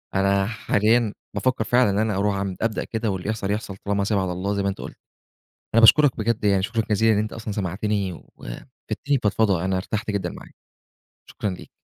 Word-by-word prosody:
أنا 100 Hz, 0 st, +3 dB
حاليًا 110 Hz, +1 st, +1 dB, 0.2 s
بافكّر 120 Hz, +3 st, +1 dB
فعلًا 125 Hz, +1 st, +3 dB
إن 100 Hz, -, 0 dB
أنا 110 Hz, -1 st, +1 dB
أروح 100 Hz, 0 st, +1 dB
أعم 100 Hz, -1 st, -2 dB
أبدأ 115 Hz, -1 st, 0 dB
كده 110 Hz, -1 st, -2 dB
واللي 95 Hz, +1 st, -4 dB
يحصل، 105 Hz, -2 st, -2 dB
يحصل 105 Hz, -2 st, -3 dB
طالما 100 Hz, 0 st, +1 dB
سايبها 100 Hz, -1 st, +1 dB
على 90 Hz, -, -2 dB
الله 95 Hz, +3 st, -2 dB
زي 100 Hz, -1 st, -1 dB
ما 100 Hz, -, +1 dB
أنت 95 Hz, -, -5 dB
قُلت. -, -, -8 dB, 0.8 s
أنا 115 Hz, -, +6 dB
باشكرك 135 Hz, +4 st, +6 dB
بجد 110 Hz, 0 st, -1 dB
يعني 100 Hz, -2 st, +3 dB
شكرًا 115 Hz, +2 st, 0 dB
جزيلًا 110 Hz, +2 st, +4 dB
إن -, -, +1 dB
أنت 110 Hz, 0 st, -2 dB
أصلًا 110 Hz, -2 st, -5 dB
سمعتني 100 Hz, 0 st, -1 dB
وفدتني 135 Hz, -, -5 dB
فضفضه، 100 Hz, -4 st, +2 dB
أنا 95 Hz, 0 st, 0 dB
ارتحت 105 Hz, +3 st, -3 dB
جدًا 95 Hz, -4 st, -2 dB
معاك، -, -, -12 dB, 0.8 s
شكرًا 105 Hz, -, -3 dB
ليك. 90 Hz, -, -9 dB
105 Hz, 200 wpm, -23 LUFS, 95-110 Hz, 0.8 s, أنا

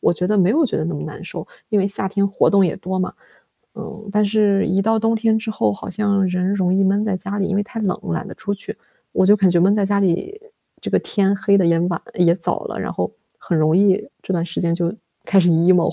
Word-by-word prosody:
我 -, -, +2 dB
觉 180 Hz, -, -2 dB
得 210 Hz, 0 st, +2 dB
没 185 Hz, 0 st, +4 dB
有 305 Hz, +6 st, +3 dB
觉 -, -, -2 dB
得 155 Hz, -, -1 dB
那 170 Hz, +1 st, -3 dB
么 145 Hz, -, -5 dB
难 155 Hz, -, -8 dB
受， -, -, -6 dB, 0.2 s
因 210 Hz, -, +2 dB
为 195 Hz, -, +2 dB
夏 195 Hz, -1 st, -2 dB
天 200 Hz, 0 st, 0 dB
活 200 Hz, -, +1 dB
动 200 Hz, -1 st, +4 dB
也 -, -, -1 dB
多 185 Hz, +1 st, -4 dB
嘛。 185 Hz, -, -2 dB, 0.6 s
嗯， 215 Hz, -1 st, -9 dB
但 210 Hz, +1 st, +2 dB
是 205 Hz, -1 st, +2 dB
一 190 Hz, +3 st, +1 dB
到 225 Hz, +2 st, +2 dB
冬 225 Hz, +1 st, +1 dB
天 220 Hz, 0 st, +1 dB
之 220 Hz, 0 st, -5 dB
后 110 Hz, -, 0 dB
好 -, -, -8 dB
像 200 Hz, -1 st, 0 dB
人 180 Hz, +1 st, -1 dB
容 185 Hz, -2 st, +1 dB
易 195 Hz, -, +2 dB
闷 200 Hz, +2 st, +2 dB
在 205 Hz, -3 st, -1 dB
家 195 Hz, +2 st, -5 dB
里， 195 Hz, -, 0 dB
因 -, -, -2 dB
为 205 Hz, -, +1 dB
太 225 Hz, +3 st, -8 dB
冷 195 Hz, -4 st, 0 dB
了 85 Hz, -, -4 dB
懒 -, -, -3 dB
得 -, -, -9 dB
出 200 Hz, -, -4 dB
去， 200 Hz, -, -7 dB, 0.4 s
我 -, -, +2 dB
就 205 Hz, +2 st, +6 dB
感 195 Hz, -2 st, +3 dB
觉 175 Hz, -1 st, +3 dB
闷 190 Hz, +3 st, +4 dB
在 205 Hz, -1 st, +1 dB
家 200 Hz, +1 st, +1 dB
里， 200 Hz, -, -1 dB, 0.4 s
这 -, -, -5 dB
个 -, -, +3 dB
天 200 Hz, -1 st, 0 dB
黑 200 Hz, +1 st, +2 dB
得 190 Hz, -, +3 dB
也 170 Hz, -1 st, +3 dB
晚 175 Hz, -1 st, -1 dB
也 170 Hz, -1 st, +3 dB
早 170 Hz, -2 st, -2 dB
了， -, -, -5 dB
然 -, -, -4 dB
后 -, -, -3 dB, 0.3 s
很 170 Hz, -, -2 dB
容 155 Hz, +1 st, +3 dB
易 200 Hz, +1 st, +2 dB
这 -, -, -5 dB
段 170 Hz, -2 st, 0 dB
时 170 Hz, 0 st, -4 dB
间 170 Hz, -1 st, +1 dB
就 170 Hz, 0 st, -1 dB, 0.3 s
开 195 Hz, -, +2 dB
始 175 Hz, -, +4 dB
emo。 170 Hz, +1 st, +3 dB
195 Hz, 300 characters per minute, -20 LUFS, 180-205 Hz, 0.6 s, 就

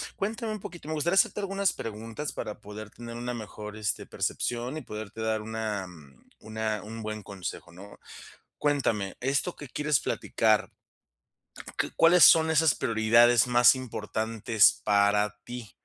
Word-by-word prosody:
Cuéntame 220 Hz, +2 st, -3 dB
un 215 Hz, -, -7 dB
poquito, 170 Hz, -4 st, -9 dB
me 155 Hz, -, -3 dB
gustaría 170 Hz, +5 st, 0 dB
hacerte 195 Hz, +1 st, +3 dB
algunas 195 Hz, -1 st, 0 dB
preguntas 115 Hz, +6 st, -6 dB
para 105 Hz, -, -6 dB
poder 105 Hz, +1 st, -9 dB
tener 115 Hz, +1 st, -9 dB
una 125 Hz, +1 st, -4 dB
mejor, 105 Hz, -2 st, -8 dB
este, 105 Hz, -2 st, -3 dB
percepción 120 Hz, +4 st, -3 dB
y 155 Hz, -, -5 dB
poderte 105 Hz, 0 st, -8 dB
dar 110 Hz, -1 st, 0 dB
una, 110 Hz, -3 st, -4 dB
mm, 75 Hz, -7 st, -16 dB
una 110 Hz, -1 st, -3 dB
un 110 Hz, +1 st, -8 dB
buen 110 Hz, 0 st, -5 dB
consejo, 95 Hz, -3 st, -7 dB
¿no? 100 Hz, +3 st, -13 dB, 0.6 s
Cuéntame, 115 Hz, -9 st, 0 dB
esto 140 Hz, +7 st, -1 dB
que 145 Hz, -, -9 dB
quieres 150 Hz, +1 st, 0 dB
platicar, 110 Hz, -1 st, +1 dB, 1.1 s
¿c -, -, 0 dB
cuáles 170 Hz, +1 st, +6 dB
son 160 Hz, 0 st, +7 dB
esas 160 Hz, -3 st, +4 dB
prioridades 115 Hz, +2 st, +4 dB
más 125 Hz, +1 st, +6 dB
importantes 110 Hz, -3 st, +1 dB
para 105 Hz, 0 st, +2 dB
ti? 120 Hz, -3 st, -8 dB
115 Hz, 150 wpm, -28 LUFS, 105-145 Hz, 1.1 s, son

